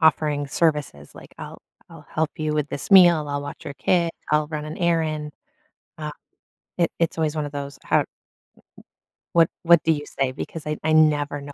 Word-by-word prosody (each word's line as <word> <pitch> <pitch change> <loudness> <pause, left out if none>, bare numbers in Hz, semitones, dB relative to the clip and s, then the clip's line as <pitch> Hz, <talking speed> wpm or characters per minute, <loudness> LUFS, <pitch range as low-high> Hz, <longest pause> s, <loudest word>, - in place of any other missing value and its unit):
offering 150 -2 +2
services- 150 - -1
like, - - -14
I'll - - -9 0.3
I'll 150 -3 -13
help 155 -1 0
you 155 -1 -2
with 150 -1 -1
this 140 - -6
meal, 175 -5 +7
I'll 145 0 -2
watch 145 - -8
your - - -5
kid, 170 0 +1 0.2
I'll 150 0 +3
run 150 -1 -4
an 155 - -6
errand, 160 -3 0 0.7
um, 150 -1 -5 0.7
it 170 - +2
it's 165 -1 0
always 160 -1 0
one 150 -1 -1
of 145 - -7
those 140 -1 -6
har - - +3
m - - -1
m - - -18 1.3
What 165 -1 +5
what 170 -1 +6
do 165 - +3
you 145 0 -5
say, 135 -1 -2
because 150 +2 -7
I 150 - -2
I 160 0 +1
never 145 -2 +3
know 145 0 -9
150 Hz, 200 wpm, -23 LUFS, 145-160 Hz, 1.3 s, meal